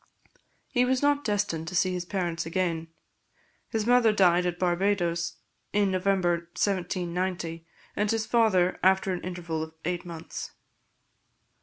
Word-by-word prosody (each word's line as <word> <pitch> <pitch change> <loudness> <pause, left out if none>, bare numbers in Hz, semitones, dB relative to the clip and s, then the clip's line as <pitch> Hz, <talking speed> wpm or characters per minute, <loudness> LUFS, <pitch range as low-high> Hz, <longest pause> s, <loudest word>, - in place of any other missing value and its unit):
He 245 -2 +2
was 255 +2 +1
not 290 0 +3
destined 205 - -1
to 180 - -5
see 185 +1 +2
his 180 -1 -3
parents 175 -3 -2
again. 165 -1 -1 0.8
His 220 -2 -1
mother 245 -2 +5
died 180 -3 +4
at 175 0 -2
Barbadoes, 175 -2 0 0.4
in 205 -1 +3
November 185 -3 +1
1790, 180 -3 -2 0.3
and 210 0 0
his 225 0 0
father 215 -6 +3
after 190 0 +3
an 180 - -4
interval 175 -3 -4
of 160 0 -7
eight 175 0 -1
months. 165 -2 -7
180 Hz, 135 wpm, -27 LUFS, 170-205 Hz, 0.8 s, mother